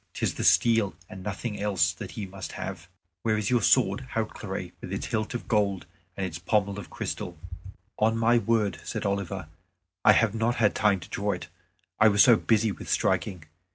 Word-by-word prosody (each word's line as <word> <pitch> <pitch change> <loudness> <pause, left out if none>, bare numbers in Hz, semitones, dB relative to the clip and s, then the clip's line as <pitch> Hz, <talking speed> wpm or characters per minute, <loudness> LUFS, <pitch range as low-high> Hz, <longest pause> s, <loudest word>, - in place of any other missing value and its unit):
'Tis - - 0
the - - -4
steel 115 -6 +4 0.2
and 95 - -8
nothing 105 +2 -4
else 95 -5 +2
that 85 - -8
he 105 - -4
must 95 0 -8
have. 90 -2 -6 0.3
Where 110 -1 +1
is 105 +1 -1
your 120 -2 +3
sword - - +3
Hautclere, - - -3
with - - -7
its - - -3
hilt 110 +2 -2
of 120 - -5
gold 100 -6 +1 0.3
and 95 - -1
its 85 -3 -5
pommel 100 +2 0
of 100 - -9
crystal?" 85 -2 -5 0.6
"On 110 +1 +3
my 120 +1 +4
word," 110 -5 0
said - - -4
Oliver, 100 -3 -2 0.6
"I 105 - +8
have 105 0 +3
not 115 +2 0
had 105 -3 +3
time 100 -3 +2
to - - -11
draw 100 0 -1
it; 90 - -7 0.5
I 110 - +7
was 105 -1 +6
so 120 -3 +7
busy 110 0 +2
with 85 - -8
striking." 90 -4 0
105 Hz, 190 wpm, -27 LUFS, 95-110 Hz, 0.6 s, I